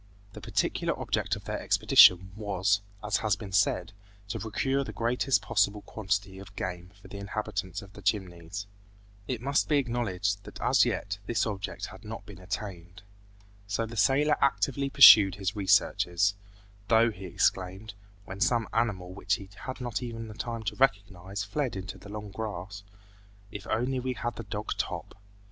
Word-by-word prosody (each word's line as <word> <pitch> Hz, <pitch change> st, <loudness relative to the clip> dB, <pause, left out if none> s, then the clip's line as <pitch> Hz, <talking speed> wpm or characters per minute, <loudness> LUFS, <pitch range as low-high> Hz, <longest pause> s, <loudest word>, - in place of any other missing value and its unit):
The -, -, -10 dB
particular -, -, -1 dB
object -, -, -1 dB
of -, -, -10 dB
their -, -, -4 dB
expedition 90 Hz, +1 st, +6 dB
was, 100 Hz, -1 st, +1 dB, 0.2 s
as 105 Hz, 0 st, +1 dB
has 110 Hz, -3 st, +1 dB
been 100 Hz, -2 st, -9 dB
said, 95 Hz, 0 st, +1 dB, 0.4 s
to 115 Hz, +1 st, -3 dB
procure 135 Hz, +6 st, -1 dB
the -, -, -7 dB
greatest 120 Hz, -2 st, +1 dB
possible 105 Hz, 0 st, +1 dB
quantity 100 Hz, -2 st, -3 dB
of 95 Hz, +1 st, -12 dB
game 90 Hz, -2 st, -5 dB
for -, -, -14 dB
the 100 Hz, -, -8 dB
inhabitants 100 Hz, -2 st, -4 dB
of 100 Hz, -1 st, -15 dB
the 100 Hz, -, -11 dB
Chimneys. 95 Hz, -2 st, -2 dB, 0.6 s
It 125 Hz, -3 st, -3 dB
must 140 Hz, +1 st, +1 dB
be 150 Hz, -, +4 dB
acknowledged 100 Hz, -6 st, -1 dB
that -, -, -10 dB
as -, -, +4 dB
yet 105 Hz, 0 st, -2 dB
this 115 Hz, -3 st, +1 dB
object 100 Hz, -3 st, -4 dB
had -, -, -12 dB
not 110 Hz, +1 st, -7 dB
been 100 Hz, -2 st, -12 dB
attained. 95 Hz, -1 st, -6 dB, 0.6 s
So 100 Hz, +3 st, -1 dB
the 115 Hz, +1 st, -9 dB
sailor 135 Hz, +9 st, +3 dB
actively 140 Hz, 0 st, +1 dB
pursued 105 Hz, -9 st, +9 dB
his 100 Hz, +1 st, -3 dB
researches, 95 Hz, -1 st, +2 dB, 0.5 s
though 115 Hz, +1 st, +4 dB
he 95 Hz, -2 st, -10 dB
exclaimed, 95 Hz, +3 st, -1 dB, 0.3 s
when 95 Hz, +1 st, -8 dB
some 115 Hz, +2 st, +2 dB
animal 100 Hz, -6 st, -1 dB
which 100 Hz, +1 st, 0 dB
he 100 Hz, -1 st, -11 dB
had 130 Hz, -, -5 dB
not 120 Hz, -2 st, -3 dB
even 115 Hz, -3 st, -6 dB
time 115 Hz, 0 st, -5 dB
to 100 Hz, -, -3 dB
recognize 100 Hz, -6 st, 0 dB
fled 125 Hz, +4 st, -2 dB
into 95 Hz, -1 st, -6 dB
the 100 Hz, -, -12 dB
long 105 Hz, -1 st, -7 dB
grass, 100 Hz, -2 st, -6 dB, 0.7 s
"If 105 Hz, -, -8 dB
only 125 Hz, +4 st, 0 dB
we 130 Hz, 0 st, -2 dB
had 115 Hz, -, -9 dB
had 120 Hz, -1 st, -2 dB
the 115 Hz, -, -5 dB
dog 105 Hz, +1 st, -3 dB
Top!" -, -, -3 dB
105 Hz, 170 wpm, -28 LUFS, 95-115 Hz, 0.7 s, pursued